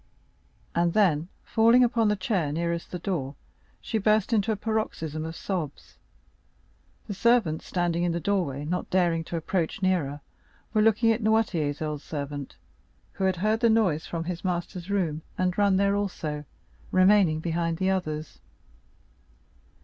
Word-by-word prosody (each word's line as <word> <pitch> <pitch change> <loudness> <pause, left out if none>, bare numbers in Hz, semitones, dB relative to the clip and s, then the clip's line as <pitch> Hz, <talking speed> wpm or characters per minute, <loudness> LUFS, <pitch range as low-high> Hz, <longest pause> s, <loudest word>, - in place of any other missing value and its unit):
And 170 0 +1
then, 170 -7 +3 0.2
falling 230 +2 +5
upon 230 -2 +2
the 210 - +2
chair 185 -6 -1
nearest 170 +2 -2
the 180 - -4
door, 155 -7 -3 0.4
she 220 - -2
burst 215 +1 +2
into 220 0 +2
a - - +1
paroxysm 200 -8 -2
of 160 +1 -6
sobs. 165 -8 -5 1.1
The 205 - -5
servants, 210 -7 +2
standing 175 -1 0
in 175 0 +1
the 170 - -1
doorway, 165 -8 -1
not 180 +4 -3
daring 175 -3 +2
to 170 - -4
approach 170 +2 -2
nearer, 150 -6 0 0.5
were 215 - +3
looking 225 +1 +4
at 225 +1 0
Noirtier's 190 -10 +1
old 150 -2 -3
servant, 145 -2 -6 0.6
who 195 - -2
had 190 -1 +2
heard 215 +5 +1
the 235 -1 +4
noise 195 -9 +2
from 165 -1 -3
his 175 0 -5
master's 180 0 -3
room, 170 -6 0 0.2
and 180 -1 0
run 200 -2 +3
there 200 +1 +2
also, 155 -7 -3 0.4
remaining 185 -4 +4
behind 165 0 -1
the 190 +1 +1
others. 155 -5 -3
180 Hz, 150 wpm, -27 LUFS, 160-205 Hz, 1.1 s, falling